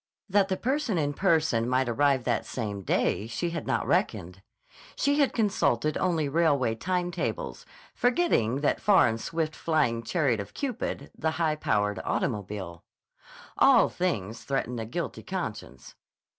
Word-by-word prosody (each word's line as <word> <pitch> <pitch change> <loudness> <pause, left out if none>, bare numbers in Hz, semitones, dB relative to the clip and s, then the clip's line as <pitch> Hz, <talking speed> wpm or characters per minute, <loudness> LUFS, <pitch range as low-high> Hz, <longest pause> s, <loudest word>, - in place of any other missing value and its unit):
That 200 -1 +3
the 190 -1 -2
answer 265 - +1
in 145 -2 0
person 160 -9 +2
might 130 0 +2
arrive 135 +2 +2
that 120 -2 0
same 105 -5 -4
day 100 +2 0
she 120 +10 -3
had 165 -3 -5
not - - 0
reckoned. 90 +3 -1 0.5
She 285 +1 +1
had 280 - +3
consulted 155 - +1
only 165 -5 0
railway 140 -6 +2
time 180 +8 -2
tables, - - -4 0.3
forgetting 240 - +1
that 145 - +1
far 200 -9 +5
and 115 0 -2
swift 160 -2 -2
flying 150 -8 +1
chariot 130 - 0
of 100 - -7
Cupid, 245 - -4
the 160 - -1
high 160 -2 +1
powered 105 -8 0
automobile. 95 -4 -3 0.8
ALL - - +6
things 115 - -2
threaten 125 -3 -2
a 110 - -4
guilty 115 - -4
conscience. - - -6
145 Hz, 145 wpm, -27 LUFS, 115-175 Hz, 0.8 s, ALL